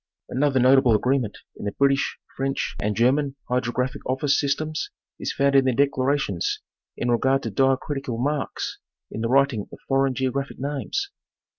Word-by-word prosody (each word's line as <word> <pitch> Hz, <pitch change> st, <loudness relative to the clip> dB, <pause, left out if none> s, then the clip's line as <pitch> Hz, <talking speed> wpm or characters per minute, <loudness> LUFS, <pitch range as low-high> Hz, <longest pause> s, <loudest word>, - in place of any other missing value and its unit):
Another 135 Hz, 0 st, +2 dB
notable 130 Hz, -2 st, +5 dB
agreement 125 Hz, -1 st, 0 dB, 0.2 s
in -, -, -7 dB
the 100 Hz, -, -2 dB
British, 140 Hz, 0 st, +2 dB, 0.2 s
French 135 Hz, 0 st, -2 dB
and 105 Hz, 0 st, 0 dB
German 135 Hz, +4 st, +2 dB
Hydrographic 125 Hz, +2 st, -1 dB
Office 135 Hz, +2 st, +2 dB
systems 155 Hz, +2 st, -1 dB, 0.3 s
is -, -, -2 dB
found 140 Hz, 0 st, +2 dB
in 135 Hz, -1 st, +5 dB
their 130 Hz, -2 st, +2 dB
declarations 135 Hz, -8 st, +1 dB, 0.4 s
in 120 Hz, -, 0 dB
regard 135 Hz, +3 st, +2 dB
to 115 Hz, -, -3 dB
diacritical 135 Hz, +1 st, 0 dB
marks 140 Hz, +3 st, -2 dB, 0.3 s
in 110 Hz, -, -4 dB
the 115 Hz, -, -1 dB
writing 135 Hz, -5 st, +2 dB
of -, -, -10 dB
foreign 135 Hz, -1 st, +2 dB
geographic 135 Hz, +1 st, -2 dB
names. 145 Hz, -, -3 dB
135 Hz, 150 wpm, -24 LUFS, 125-140 Hz, 0.4 s, notable